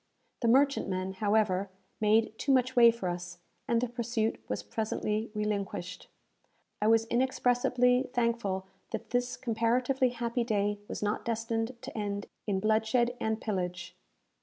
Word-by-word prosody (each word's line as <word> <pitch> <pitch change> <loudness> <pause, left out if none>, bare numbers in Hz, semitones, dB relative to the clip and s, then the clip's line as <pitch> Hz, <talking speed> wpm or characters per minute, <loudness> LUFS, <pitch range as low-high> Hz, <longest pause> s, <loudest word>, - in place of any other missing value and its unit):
The 235 - +1
merchantman, 225 -8 +2
however, 200 -1 +1 0.3
made 220 +1 +3
too 280 - +1
much 255 -1 +3
way 235 -1 +8
for 230 -5 -2
us, 175 0 -4 0.3
and 235 - +2
the 250 - 0
pursuit 235 -2 -1
was - - -3
presently 215 0 -2
relinquished. 200 -3 -3 0.7
I 210 - +2
was 225 0 +4
inexpressibly 250 +1 +2
thankful 230 -6 0 0.2
that - - -6
this 245 0 0
comparatively 250 +2 +1
happy 240 0 -1
day 205 -2 0
was - - -5
not 205 +1 -1
destined 230 +1 -2
to 270 +2 -8
end 205 -2 -3 0.2
in 195 -2 +1
bloodshed 220 +3 +2
and 220 0 0
pillage. 180 -4 -3
225 Hz, 135 wpm, -30 LUFS, 205-245 Hz, 0.7 s, way